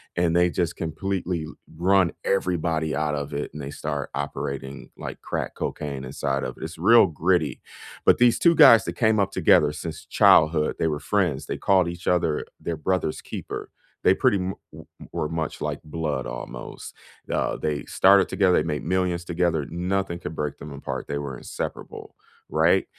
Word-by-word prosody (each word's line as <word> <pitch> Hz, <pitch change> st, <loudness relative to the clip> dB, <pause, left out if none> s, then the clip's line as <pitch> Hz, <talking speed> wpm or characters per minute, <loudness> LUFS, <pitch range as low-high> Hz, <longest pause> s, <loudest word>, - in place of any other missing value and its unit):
and 85 Hz, -1 st, +1 dB
they 90 Hz, 0 st, +4 dB
just 85 Hz, -2 st, -1 dB
completely 85 Hz, +1 st, -3 dB
l 75 Hz, -, -11 dB, 0.2 s
run 90 Hz, +1 st, +3 dB
everybody 85 Hz, -5 st, 0 dB
out 75 Hz, 0 st, 0 dB
of 70 Hz, 0 st, -5 dB
it, 75 Hz, -, -3 dB
and 75 Hz, -, -8 dB
they 70 Hz, +1 st, -6 dB
start 75 Hz, -1 st, -4 dB
operating, 70 Hz, -1 st, -5 dB
like, -, -, -7 dB
crack -, -, -4 dB
cocaine 70 Hz, -2 st, -4 dB
inside 70 Hz, +1 st, -2 dB
of -, -, -5 dB
it's 80 Hz, +1 st, -6 dB
real 100 Hz, +5 st, +6 dB
gritty. 85 Hz, 0 st, 0 dB, 0.5 s
But -, -, +5 dB
these 120 Hz, -1 st, +5 dB
2 170 Hz, -1 st, +5 dB
guys 130 Hz, -8 st, +8 dB
that -, -, -3 dB
came 110 Hz, -2 st, +2 dB
up 100 Hz, -1 st, +1 dB
together 75 Hz, -, +4 dB
since 80 Hz, 0 st, -7 dB
childhood, 75 Hz, 0 st, +4 dB
they -, -, 0 dB
were 75 Hz, -2 st, -1 dB
friends. 85 Hz, -9 st, 0 dB
They -, -, -3 dB
called 95 Hz, -3 st, +3 dB
each 85 Hz, 0 st, -7 dB
other 85 Hz, -4 st, +1 dB
their 85 Hz, -2 st, -4 dB
brother's 85 Hz, 0 st, -1 dB
keeper. -, -, -7 dB, 0.3 s
They -, -, +6 dB
pretty 100 Hz, -, +2 dB
mu 95 Hz, +1 st, -2 dB, 0.2 s
we -, -, -11 dB, 0.3 s
were 75 Hz, -, -2 dB
much 80 Hz, -1 st, -4 dB
like -, -, -3 dB
blood, 75 Hz, -4 st, -3 dB
almost. -, -, -8 dB, 0.4 s
Uh, -, -, 0 dB
they 75 Hz, -1 st, -2 dB
started 95 Hz, 0 st, +4 dB
together, 95 Hz, -3 st, +3 dB
they -, -, +3 dB
made 75 Hz, -3 st, -2 dB
millions 90 Hz, -1 st, 0 dB
together, 85 Hz, -4 st, 0 dB
nothing 90 Hz, +1 st, -2 dB
could 80 Hz, -, -6 dB
break 75 Hz, -2 st, -3 dB
them 75 Hz, +1 st, -9 dB
apart, 70 Hz, -, -5 dB
they 70 Hz, -, -2 dB
were 70 Hz, -3 st, -5 dB
inseparable, -, -, -7 dB, 0.3 s
right? 80 Hz, +4 st, +3 dB
80 Hz, 175 wpm, -24 LUFS, 75-90 Hz, 0.5 s, guys